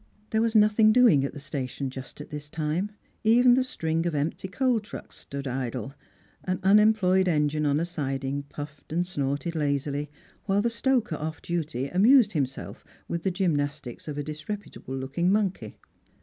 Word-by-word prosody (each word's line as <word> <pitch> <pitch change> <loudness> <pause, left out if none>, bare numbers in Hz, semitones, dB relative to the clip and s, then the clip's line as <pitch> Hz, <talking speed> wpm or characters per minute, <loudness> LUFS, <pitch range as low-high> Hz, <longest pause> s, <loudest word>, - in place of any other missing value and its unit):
There 220 - +2
was 230 0 0
nothing 215 +1 +6
doing 225 - +5
at 140 - -2
the 145 - -9
station 140 -2 -4
just 130 +2 -8
at - - -11
this 150 0 -6
time; 160 +6 -1 0.3
even 245 +3 +6
the 255 +1 +3
string 165 -8 -1
of 165 - -2
empty 150 +6 -2
coal 245 +5 +1
trucks 210 - -10
stood 140 0 -6
idle, 130 +1 -3 0.5
an 185 -1 -1
unemployed 195 -2 +5
engine 150 -2 +1
on 145 +1 +2
a 165 - 0
siding 140 -4 -3
puffed 150 0 -9
and 175 +3 +1
snorted 145 -1 -2
lazily, 145 -1 -1 0.4
while 200 +1 +2
the 235 - +1
stoker 235 - +1
off 155 +1 -4
duty 155 -6 -2
amused 215 - +5
himself 135 -5 -3 0.2
with 170 - -3
the 190 - 0
gymnastics 145 - -2
of 150 -1 -4
a 145 - -2
disreputable 155 - -6
looking 140 +8 0
monkey. 200 -2 -1
160 Hz, 165 wpm, -27 LUFS, 145-205 Hz, 0.5 s, nothing